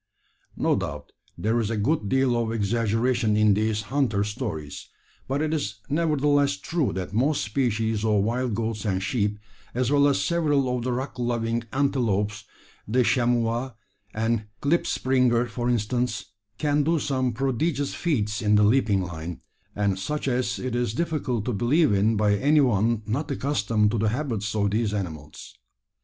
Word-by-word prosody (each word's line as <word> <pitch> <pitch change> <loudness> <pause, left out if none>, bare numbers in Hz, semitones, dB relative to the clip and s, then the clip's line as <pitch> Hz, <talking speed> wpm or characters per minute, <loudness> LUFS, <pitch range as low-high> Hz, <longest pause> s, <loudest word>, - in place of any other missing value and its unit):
No - - +2
doubt - - -5 0.3
there 110 +3 +1
is 110 -3 -1
a 115 - -1
good 105 0 0
deal 130 -1 +2
of 115 -1 0
exaggeration 115 +1 +1
in 105 -1 +5
these 110 +1 0
"hunter 115 -4 0
stories;" 105 - -5 0.4
but 140 +3 0
it 155 0 -1
is 110 -9 -2
nevertheless 145 -6 +2
true 135 - -1
that 95 +1 -5
most 140 +7 +1
species 110 -2 0
of 105 -3 +2
wild 120 +1 -1
goats 110 -1 -2
and 95 -3 -1
sheep, 105 -1 0 0.4
as 125 +1 0
well 145 0 +5
as 140 - +2
several 145 -7 +1
of 125 - -2
the 125 - -1
rock 130 +1 -4
loving 115 -1 -1
antelopes 115 -7 0 0.4
the 125 +4 +2
chamois 120 +1 +1 0.4
and 110 0 -1 0.2
klipspringer, 130 -6 +2
for 120 +1 -3
instance 120 -2 -1 0.3
can 145 +2 +1
do 165 +3 +2
some 130 -3 0
prodigious 135 +4 -1
feats 110 -10 -1
in 105 -1 +3
the 105 - +5
leaping 105 -4 +3
line, 85 -1 -6 0.3
and 100 -2 0
such 150 +10 -3
as 125 -2 0
it 130 -2 -4
is 120 -3 -1
difficult 145 -9 -1
to 125 - -1
believe 130 - +3
in 105 +3 +2
by 105 -1 +3
any 145 +8 +3
one 115 -3 +2
not 140 +8 -2
accustomed 115 -7 +1
to 115 - -1
the 110 0 +2
habits 110 -5 -2
of 100 -2 +1
these 105 -1 0
animals. 80 -7 -6
115 Hz, 160 wpm, -25 LUFS, 105-135 Hz, 0.4 s, in